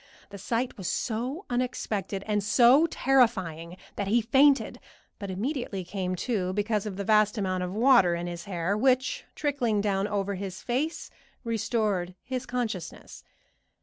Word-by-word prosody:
The 200 - -9
sight 230 +4 -2
was 185 - -4
so 255 - -3
unexpected 215 -6 -2
and 210 -1 0
so 250 +9 +5
terrifying 190 - +1 0.2
that 200 - -2
he 225 +4 +3
fainted, 270 +5 +3 0.4
but 200 -2 -6
immediately 215 -1 -3
came 185 0 -3
to, 190 -7 -1
because 210 +1 -1
of 200 - -5
the 200 - -2
vast 215 +1 +3
amount 185 -2 -1
of 180 0 -3
water 215 -5 +4
in 170 0 -4
his 175 +1 -6
hair, 185 0 -1
which, 260 - +1
trickling 250 -8 0
down 200 -1 0
over 200 -1 -2
his 190 -1 -6
face, 275 +7 -2 0.3
restored 215 -6 -1
his 255 0 -4
consciousness. 235 -8 -5
210 Hz, 150 wpm, -27 LUFS, 190-245 Hz, 0.4 s, so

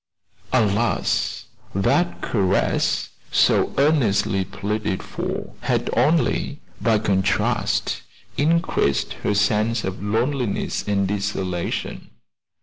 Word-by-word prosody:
Alas! 110 -1 +1 0.3
that 175 - +1
caress, 95 -3 +1 0.2
so - - +3
earnestly 110 -10 +2
pleaded 105 0 -3
for, - - -5
had - - 0
only 155 -2 +2 0.2
by 115 -2 +3
contrast 100 -1 0 0.3
increased 155 - +1
her 105 - 0
sense 105 +3 +2
of 95 0 -4
loneliness 115 +3 -1
and 100 -1 +1
desolation. 95 -3 -3
105 Hz, 85 wpm, -22 LUFS, 100-125 Hz, 0.3 s, so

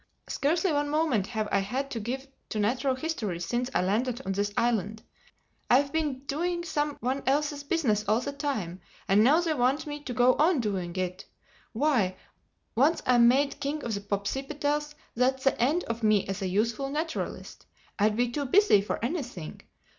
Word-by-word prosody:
Scarcely 330 +4 +1
one 290 0 0
moment 295 -10 +1
have 220 -2 -2
I 200 - +3
had 260 +8 -3
to 230 - -3
give 255 +5 -4 0.2
to 220 - -4
natural 255 +6 +1
history 255 - -3
since 240 +8 -2
I - - +3
landed 235 +6 0
on 195 - -1
this 205 +1 -1
island. 220 -2 0 0.7
I've 275 +3 +4
been 295 -5 -1
doing 345 +5 -1
some 295 -3 -1
one 260 +3 -1
else's 290 +1 +1
business 275 - +1
all 215 +2 +3
the 270 +3 -4
time. 260 - -3 0.3
And 200 +2 +5
now 295 +8 +5
they 330 -2 0
want 260 +1 +1
me 295 -1 -6
to - - -4
go 250 +1 +5
on 315 0 +3
doing 190 -6 -2
it! 185 +1 -3 0.5
Why, 230 -8 +2 0.6
once 290 +8 +2
I'm 240 -2 +6
made 275 +3 +2
King 290 +1 -3
of 230 - -2
the 200 - -3
Popsipetels, 285 +9 -2 0.2
that's 260 +2 +1
the 270 - +2
end 300 +9 +2
of 230 0 -4
me 215 -3 +3
as 195 +1 -4
a 190 - -1
useful 225 +8 0
naturalist. 315 +3 -4 0.3
I'd 210 +1 +3
be 245 +1 +1
too 285 +3 -2
busy 385 - +5
for 200 - -3
anything. 245 - -5
255 Hz, 180 wpm, -28 LUFS, 210-290 Hz, 0.7 s, I'm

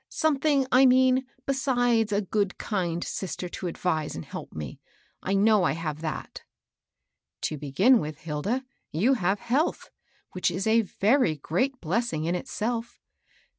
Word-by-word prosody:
*^ - - -43
Something, 290 -2 +2
I 260 +1 +7
mean, 260 0 +4 0.2
beside 245 -5 +1
a 205 0 0 0.3
kind, - - -7 0.4
good - - -1
sister 180 -1 -4
to 180 - -5
advise 160 -3 -2
and 80 - -6
help - - -8
me. 75 -4 -7 0.4
I 195 - -1
know 210 0 +4
I - - +2
have 155 -2 -4
that." 155 -2 -5 0.5
" - - -59
To 155 - -5
begin 190 - +4
with, 150 +1 -6
Hilda, 170 - -2 0.3
you 210 - +3
have 195 -4 0
health, 260 +8 -1 0.4
which 185 - 0
is 190 +3 -3
a 225 +1 +4
very 215 - +2
great 250 - -1
blessing 175 -2 -1
in 170 - 0
itself. 230 +5 -3
210 Hz, 155 wpm, -27 LUFS, 165-255 Hz, 0.5 s, I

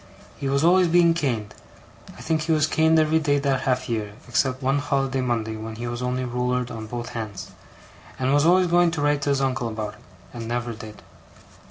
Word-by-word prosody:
He 135 - -2
was 140 +2 +1
always 180 +2 +5
being 170 0 +4
caned 115 -9 -2 0.6
I - - -11
think 160 -1 0
he 160 +2 -1
was 155 -2 +3
caned 160 0 +3
every 160 0 +3
day 145 -2 +1
that 140 -2 0
half 130 -1 0
year, 110 -4 -3
except 130 +2 0
one 135 +2 +2
holiday 135 -2 0
Monday 115 -3 -1
when 110 +1 -7
he 120 +2 -6
was 120 0 -4
only 125 +1 -1
ruler'd 125 0 -1
on 110 -2 -6
both 120 +1 -5
hands 110 -4 -6 0.7
and 130 +1 +1
was 145 0 +4
always 185 +1 +5
going 175 0 +4
to - - -1
write 145 -1 +2
to 145 - -1
his 140 -1 +1
uncle 130 -3 0
about 110 -2 -4
it, - - -18 0.3
and 115 -2 -6
never 120 0 -2
did. 110 -1 -11
130 Hz, 210 wpm, -24 LUFS, 120-150 Hz, 0.7 s, always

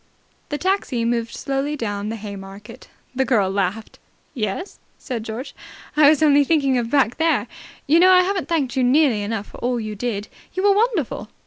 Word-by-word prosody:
The 290 - -2
taxi 350 -10 -1
moved 235 -1 -1
slowly 275 +2 -2
down 205 -5 -3
the 225 - -3
Haymarket. 200 +2 -10 0.2
The 265 +1 +1
girl 210 -8 +1
laughed. 200 +2 -3 0.3
"Yes?" 215 - -4 0.2
said 240 -5 -5
George. 225 +5 -6 0.4
"I 300 -1 +7
was 310 0 +3
only 290 -1 +5
thinking 280 -3 +2
of 230 -1 -3
back 265 -3 +2
there. 325 0 +2 0.4
You 315 +4 +4
know, 365 +2 +6
I 365 -1 +6
haven't 380 0 -2
thanked 285 -6 0
you 260 - +1
nearly 255 -3 +3
enough 205 0 -3
for - - -12
all 245 0 -1
you 215 -1 -5
did. 210 -1 -3 0.3
You 375 - -2
were 405 0 +5
wonderful." 395 - 0
250 Hz, 185 wpm, -21 LUFS, 215-305 Hz, 0.4 s, I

